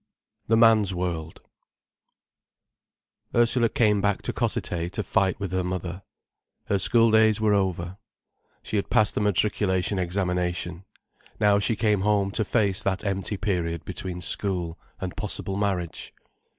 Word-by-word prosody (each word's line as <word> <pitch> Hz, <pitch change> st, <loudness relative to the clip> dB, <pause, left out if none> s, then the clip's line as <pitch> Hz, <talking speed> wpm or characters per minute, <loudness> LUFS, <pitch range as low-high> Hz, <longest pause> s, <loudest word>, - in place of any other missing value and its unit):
THE 115 Hz, -, +3 dB
MAN'S 110 Hz, -4 st, +5 dB
WORLD 85 Hz, -3 st, -4 dB, 1.9 s
Ursula 120 Hz, 0 st, +3 dB
came 105 Hz, -3 st, +2 dB
back 100 Hz, -1 st, 0 dB
to -, -, -3 dB
Cossethay 85 Hz, 0 st, -2 dB
to 105 Hz, -, -2 dB
fight 100 Hz, -2 st, +1 dB
with 100 Hz, -3 st, -4 dB
her 95 Hz, 0 st, 0 dB
mother. 90 Hz, 0 st, -4 dB, 0.6 s
Her 100 Hz, -, 0 dB
schooldays 110 Hz, 0 st, +4 dB
were 110 Hz, -1 st, +3 dB
over. 95 Hz, -1 st, -1 dB, 0.6 s
She 110 Hz, -, -2 dB
had 100 Hz, -, -2 dB
passed 105 Hz, -, +3 dB
the -, -, -1 dB
matriculation 100 Hz, -1 st, +1 dB
examination. 90 Hz, -1 st, -2 dB, 0.5 s
Now 105 Hz, -1 st, +4 dB
she 110 Hz, +2 st, 0 dB
came 105 Hz, -2 st, +1 dB
home 100 Hz, -1 st, +1 dB
to 110 Hz, -, -1 dB
face 100 Hz, -3 st, +1 dB
that 95 Hz, +1 st, -1 dB
empty 100 Hz, +1 st, -2 dB
period 85 Hz, -5 st, -2 dB
between 90 Hz, -2 st, -5 dB
school 90 Hz, -3 st, -2 dB, 0.2 s
and 95 Hz, -2 st, -5 dB
possible 100 Hz, -2 st, -3 dB
marriage. 95 Hz, -5 st, -2 dB
100 Hz, 135 wpm, -25 LUFS, 90-105 Hz, 1.9 s, MAN'S